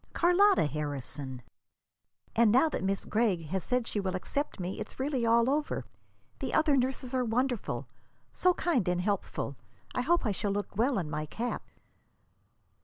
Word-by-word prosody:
"Carlotta 370 - +5
Harrison. 145 -3 -4 0.9
And 230 -2 +5
now 260 +7 +5
that - - -3
Miss 195 0 -1
Gregg 210 -7 +1
has 190 0 -1
said 250 -2 0
she 215 - -2
will 190 -2 -1
accept 285 +10 -2
me, 180 +1 -4
it's - - -7
really 265 -3 0
all 230 +1 +5
over. 295 +3 0 0.5
The - - -2
other 310 -2 +4
nurses 260 0 -1
are 255 -1 +2
wonderful 245 0 -1 0.5
so 365 -1 +3
kind 265 - +1
and 180 0 +1
so - - -5
helpful. 200 -8 -2 0.4
I 250 - 0
hope 340 +4 +2
I 215 - +2
shall 205 +1 -1
look 200 0 -3
well 245 +5 +2
in 175 -5 -1
my 150 0 -3
cap." 240 +9 -3
230 Hz, 170 wpm, -30 LUFS, 185-265 Hz, 0.9 s, Carlotta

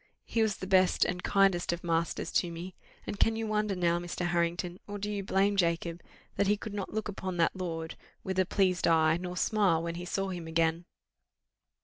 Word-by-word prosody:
He 230 - 0
was 215 -3 +1
the - - -6
best 185 -1 +4
and 180 0 -2
kindest 195 -3 +3
of 170 0 -4
masters 165 -1 -1
to 175 - +1
me. 175 +3 -7 0.3
And 205 - -5
can 225 - +3
you 225 0 -2
wonder 210 -2 0
now, 175 -1 +1
Mr. 175 0 -4
Harrington, 175 +1 -1
or 205 0 -5
do 205 +1 -3
you 205 -1 -2
blame 195 +1 +2
Jacob, 170 -2 0 0.4
that 200 - +2
he 210 +1 +3
could 205 0 -7
not 200 -2 -4
look 220 0 -2
upon 190 -3 -4
that 165 +2 +2
lord 165 -3 -4 0.3
with 190 0 -2
a 185 - +4
pleased 185 -3 +2
eye, 160 -1 +4
nor 180 0 -5
smile 195 -6 +2
when 170 0 -3
he 175 +1 -6
saw 195 +2 -2
him 175 -3 -5
again?" 165 +1 +1
180 Hz, 210 wpm, -30 LUFS, 170-200 Hz, 0.4 s, best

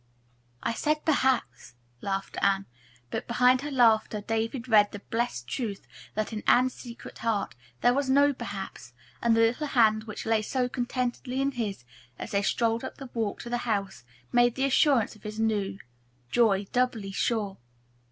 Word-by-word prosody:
"I 230 - 0
said 305 +5 0
'perhaps,'" 260 - +1 0.3
laughed 195 0 -3
Anne, 195 0 +2 0.5
but - - -3
behind 250 +2 +4
her 295 - -4
laughter 225 -5 +3
David 225 +4 -2
read 210 -3 +5
the - - -6
blessed 205 - -3
truth 205 - -4 0.3
that 215 +1 -2
in 215 - -3
Anne's 255 +1 +5
secret 235 -2 -10
heart 220 - -1 0.3
there 245 - +5
was 275 0 0
no 285 +2 +5
"perhaps," 195 - -7 0.3
and 230 -1 +3
the - - +5
little 240 +7 +2
hand 220 -4 +3
which 215 - -7
lay 225 -1 +2
so 250 +3 -1
contentedly 250 +1 -2
in 275 +1 +1
his, 215 - -4 0.3
as - - -7
they 200 - +2
strolled 230 +3 +1
up - - -6
the 270 -3 -9
walk 220 -4 -2
to 240 - -7
the 240 - +1
house, 195 - -2 0.3
made 240 -1 +4
the 270 - +1
assurance 270 -4 +3
of 215 - -18
his 215 +1 -6
new 205 -3 0 0.5
joy 205 -1 +3
doubly 245 -5 0
sure. 205 -1 -1
230 Hz, 170 wpm, -28 LUFS, 205-250 Hz, 0.5 s, read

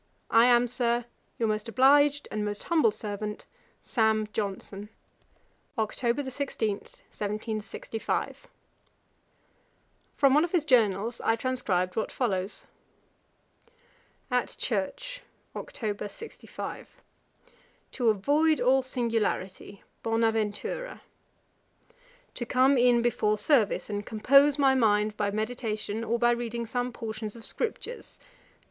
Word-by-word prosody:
'I 230 +1 +7
am, 245 0 +5
Sir, 240 -1 0 0.3
'Your 230 - +1
most 215 +1 -2
obliged 285 +4 +4
'And 215 0 -2
most 205 0 -4
humble 315 -9 +3
servant, 210 0 -5 0.4
'Sam. 220 -2 +1
Johnson.' 200 0 -4 0.9
'Oct. 240 +5 -1
16, 265 -5 -2
1765.' 220 - -5 1.7
From 275 -2 +5
one 300 +2 +5
of 345 - -3
his 335 -4 +2
journals 230 -4 +2
I 225 - +2
transcribed 220 -8 -1
what 220 - -1
follows: 195 -5 -2 1.7
'At 250 -1 0
church, - - -3 0.3
Oct. 210 -2 -4
65. 455 - -9 0.9
'To 245 -3 +1
avoid 295 +10 +3
all 260 +2 +4
singularity; 225 -6 -2 0.2
Bonaventura. 225 - -1 1.3
'To 240 - -4
come 260 +2 +4
in 240 -1 +4
before 215 -3 +1
service, 220 -1 +2
and 205 -1 -3
compose 275 +7 +4
my 275 -2 +4
mind 210 -4 +2
by 205 -1 0
meditation, 215 0 -3
or 230 +1 0
by 240 0 +3
reading 235 -1 -2
some 245 +2 -2
portions 220 -2 -5
of 230 - -11
scriptures. 475 +1 -4
230 Hz, 105 wpm, -28 LUFS, 215-260 Hz, 1.7 s, I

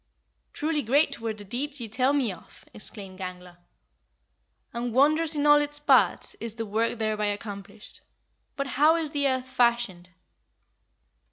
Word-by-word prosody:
"Truly 305 0 -1
great 280 +4 +2
were 225 -1 -2
the 205 - -7
deeds 275 +7 -3
ye 235 - -4
tell 255 +5 +1
me 275 -7 +1
of!" 180 - -14
exclaimed 195 -3 0
Gangler; 180 -1 -8 1.2
"and 235 0 -3
wondrous 305 +4 +3
in 290 0 0
all 295 0 +7
its 295 0 0
parts 295 - +3
is 230 -1 -5
the 225 -1 -4
work 225 +3 -1
thereby 215 -1 -1
accomplished. 205 0 -6 0.5
But 275 - -2
how 295 +4 +3
is 320 -3 -2
the 285 -2 +1
earth 260 -1 -1
fashioned?" 235 -8 0
240 Hz, 150 wpm, -26 LUFS, 210-290 Hz, 1.2 s, all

